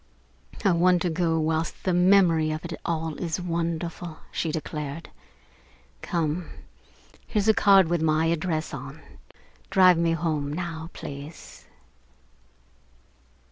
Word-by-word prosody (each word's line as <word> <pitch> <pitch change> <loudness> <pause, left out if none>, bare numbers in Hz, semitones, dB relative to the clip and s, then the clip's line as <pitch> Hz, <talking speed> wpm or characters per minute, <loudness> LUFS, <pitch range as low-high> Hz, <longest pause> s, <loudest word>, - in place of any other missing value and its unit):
"I 195 - +5
want 175 +1 +3
to 175 - 0
go 165 -1 +1
whilst 160 +1 -1
the 185 - +1
memory 175 -3 +4
of 155 +2 -4
it 170 - -5
all 160 -1 -2
is 170 -1 -2
wonderful," 170 -1 -3
she 160 - -2
declared. 150 0 -5 0.9
"Come. 165 0 -2 0.8
Here's 210 -1 0
a 220 - +6
card 195 -4 +5
with 170 -1 0
my 155 0 +2
address 165 -1 -1
on. 135 +2 -7 0.7
Drive 185 -3 +5
me 165 0 +2
home 155 -4 -1
now, 165 0 -5
please." 145 +3 -10
165 Hz, 120 wpm, -26 LUFS, 155-175 Hz, 0.9 s, a